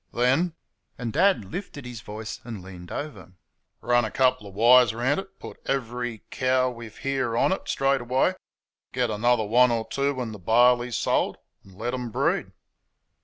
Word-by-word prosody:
"THEN" 135 +8 +2 0.4
(and 120 -2 -4
Dad 185 - +3
lifted 145 - -7
his 120 -4 -7
voice 105 +2 -7
and 110 -6 -7
leaned 90 -2 -11
over) 145 - -6 0.5
"run 120 0 +3
a 110 - -2
couple 130 -3 +1
of 95 - -12
wires 120 +1 +6
round 130 +7 +1
it, 195 0 -10
put - - -11
every 120 -4 -2
cow 130 0 +1
we've 115 -3 -10
here 135 -4 -1
on - - +3
it 190 - -2
straight 135 -1 +1
away; 130 +9 +1 0.6
get 125 -3 0
another 115 +1 +2
one 125 +4 +5
or 115 -1 -1
two 140 +4 -1
when 125 -3 -4
the 105 - -9
barley's 120 +4 +3
sold, - - 0 0.3
and 95 -1 -17
let 120 +5 -3
them 125 -1 -4
breed." - - 0
120 Hz, 170 wpm, -25 LUFS, 110-130 Hz, 0.6 s, wires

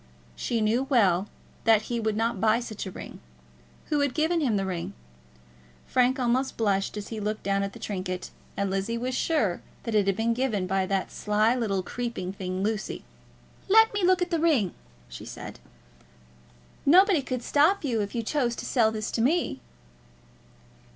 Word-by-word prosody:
She 230 - -1
knew 230 +5 +2
well 200 -7 +3 0.4
that 220 -2 +5
he 235 +1 -2
would 220 -1 -1
not 225 -3 0
buy 220 +1 +4
such 215 -4 -6
a - - -6
ring. - - -9 0.7
Who 300 - +3
had 285 -3 0
given 320 +2 +1
him 235 -8 +1
the 195 - -1
ring? 180 -3 -4 0.9
Frank 255 +1 +2
almost 255 +2 0
blushed 200 -2 0
as 205 - -6
he 225 - -5
looked 210 +1 -3
down 195 0 +1
at 200 0 -3
the - - -10
trinket, 185 -2 -4 0.3
and 200 -1 0
Lizzie 195 +4 -1
was 250 +2 -2
sure 250 - 0 0.2
that 230 - -3
it 205 -2 +3
had 195 - +2
been 225 +2 +1
given 230 -6 0
by 190 0 0
that 195 -1 -1
sly 215 +2 +2
little 205 -7 -1
creeping 230 -5 -4
thing, 185 -1 -4
Lucy. 215 0 -2 0.7
"Let 445 +2 +6
me 410 -2 -1
look 365 0 +4
at 355 - -6
the 335 - +1
ring," 285 - +2 0.3
she - - -9
said. - - -8 1.2
"Nobody 365 +2 +6
could 255 -2 -4
stop 320 +7 +3
you 235 -6 0
if 200 +2 -4
you 230 - -1
chose 240 -1 0
to - - -6
sell 225 -4 +3
this 215 -1 -4
to 230 - -1
me." 285 - +1
225 Hz, 180 wpm, -27 LUFS, 200-260 Hz, 1.2 s, Let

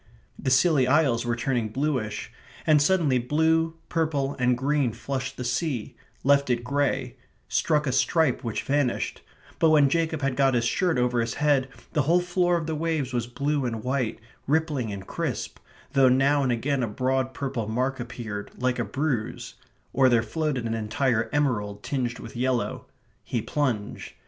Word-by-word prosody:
The - - -1
Scilly 130 0 +4
Isles 130 -4 +3
were 120 - +1
turning 120 -2 -1
bluish; 120 -4 -2 0.3
and 155 -2 +5
suddenly 150 -5 +3
blue, 160 +5 +1
purple, 150 -4 0
and 125 -1 +2
green 135 -2 +1
flushed 130 +3 -4
the 125 - -4
sea; 125 -1 -2 0.3
left 140 0 +4
it 120 -1 +1
grey; 135 -1 -1 0.3
struck 150 -2 +1
a 130 - 0
stripe 140 -1 +2
which 115 -3 -3
vanished; 140 -3 0 0.4
but 160 - +5
when 150 -3 +5
Jacob 160 -1 0
had 135 -1 0
got 135 -1 +3
his 120 -1 +1
shirt 175 +6 +1
over 125 -1 +2
his 115 -1 -2
head 145 -3 +2 0.2
the 150 - +3
whole 165 +6 +3
floor 175 0 +1
of 165 - -3
the 160 - -2
waves 155 -4 -1
was 120 -1 -1
blue 140 +3 -1
and 115 -3 -3
white, 130 -3 -1 0.3
rippling 145 -6 0
and 100 -1 -6
crisp, - - -4 0.3
though 135 -2 +5
now 135 +3 +3
and 130 -2 +1
again 130 +3 0
a 120 - 0
broad 130 +3 -1
purple 130 -6 -3
mark 130 +4 -1
appeared, 115 -4 -6
like 125 0 0
a - - +1
bruise; 135 -6 -3 0.4
or 130 -1 +5
there 120 -2 +3
floated 145 -1 -2
an 115 - -1
entire 115 0 0
emerald 105 -9 -1
tinged 125 -3 -2
with - - -10
yellow. 125 0 -1 0.4
He 120 +3 -2
plunged. 115 -4 -2
130 Hz, 170 wpm, -26 LUFS, 120-150 Hz, 0.4 s, and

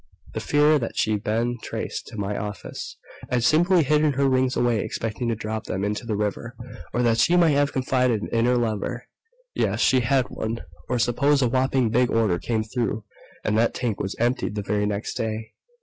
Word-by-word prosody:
The - - -2
fear 150 +1 +3
that 115 - -5
she'd 105 -1 +1
been 120 +2 -1
traced - - -5
to 115 - -9
my 100 0 -2
office 105 -1 -6 0.3
I'd 125 -2 +1
simply 170 +6 +4
hidden 150 +1 +3
her 140 +1 +2
rings 130 -1 +2
away, 120 -2 +2
expecting 115 +3 -3
to 115 - 0
drop 110 0 -4
them 95 +1 -3
into 105 +3 -2
the 110 - -1
river 105 +4 -3 0.4
or 120 - 0
that 115 -1 +2
she 170 - +4
might 170 -3 +5
have 145 0 +2
confided 125 -4 +1
in 115 0 +1
her 125 0 +3
lover... 120 +1 -2 0.5
yes, - - 0
she 130 - +4
had 130 +1 +2
one. 115 +1 -3 0.3
Or, 125 - +1
suppose 140 +4 +2
a - - +3
whopping 130 -1 +1
big 125 +1 +3
order 105 -6 +2
came 110 -2 -1
through 115 -1 -2 0.4
and 105 - 0
that 115 - +2
tank 115 -5 -2
was 95 - -3
emptied 120 -3 0
the 105 - -2
very 105 +1 0
next 105 +1 -3
day. 110 0 -3
120 Hz, 195 wpm, -24 LUFS, 110-130 Hz, 0.5 s, might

